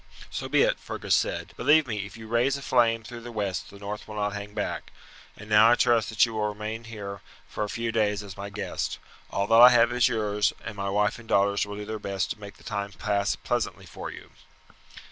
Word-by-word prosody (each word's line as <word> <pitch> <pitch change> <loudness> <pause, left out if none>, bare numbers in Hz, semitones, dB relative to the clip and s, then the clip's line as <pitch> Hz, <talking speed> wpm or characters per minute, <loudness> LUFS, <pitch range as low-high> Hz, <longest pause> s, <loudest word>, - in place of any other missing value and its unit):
"So - - -4
be - - +4
it!" - - +1
Fergus - - -2
said. - - -1
"Believe 155 +1 +5
me, 105 -4 -3
if 110 - -13
you 110 - -10
raise 120 +4 +2
a 140 - -9
flame 115 -3 +3
through 120 +1 -9
the 120 +1 -8
west 100 -5 -3
the 100 - -12
north 105 +1 -6
will 105 - -8
not 105 -1 0
hang 105 0 -7
back. - - -3 0.5
And 105 - -11
now 110 +1 +7
I 120 - +6
trust 120 -3 +3
that 110 +1 +4
you 115 - -7
will 105 -1 0
remain 105 +2 -5
here 100 -3 -7 0.3
for - - -3
a 105 - -3
few 115 +1 -2
days 105 -2 +1
as 100 -3 -9
my 100 0 -6
guest. 105 +1 -3 0.3
All 100 - 0
that 115 +2 +6
I 125 - +12
have 120 -1 +5
is 120 0 +4
yours, 105 -4 +1
and 110 - -5
my 100 0 -3
wife 105 +3 +1
and 115 - -14
daughters 100 +1 +2
will 105 - -6
do 105 0 -6
their 110 0 -5
best 100 -3 -2
to - - -5
make 100 -1 -10
the - - -19
time 100 -1 -3
pass 100 +1 0
pleasantly - - -2
for - - -7
you." - - -11
105 Hz, 240 wpm, -27 LUFS, 100-115 Hz, 0.5 s, I